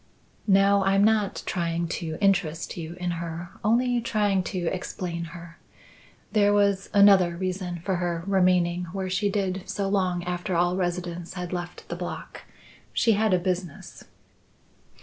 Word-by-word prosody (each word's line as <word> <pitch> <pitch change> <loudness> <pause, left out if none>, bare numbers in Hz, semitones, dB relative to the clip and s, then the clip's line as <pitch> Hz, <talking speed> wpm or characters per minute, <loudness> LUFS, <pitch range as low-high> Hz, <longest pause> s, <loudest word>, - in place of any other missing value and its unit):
"No, 195 0 +5
I'm 195 +1 +3
not 210 -2 +2
trying 170 -1 -1
to 160 -2 -4
interest 180 -5 +1
you 170 0 -6
in 180 0 -3
her, 170 +1 -6
only 240 +2 +2
trying 205 -4 +1
to 185 - -4 0.2
explain 175 -2 -4
her. 170 0 -11 0.7
There 205 -2 +4
was 200 -2 +2
another 195 -4 +5
reason 185 -1 -3
for 190 -2 0
her 175 -1 -2
remaining 180 -2 +2
where 190 -1 -3
she 205 +2 +1
did 195 -2 -1
so 200 -1 -1
long 185 -3 0
after 180 +1 -2
all 175 +1 +2
residents 175 -1 -3
had 180 -1 -5
left 175 0 -6
the 175 - -4
block. 175 0 -7 0.5
She 230 - +3
had 215 0 +2
a 185 - +5
business." 180 -2 -4
185 Hz, 150 wpm, -26 LUFS, 175-195 Hz, 0.7 s, No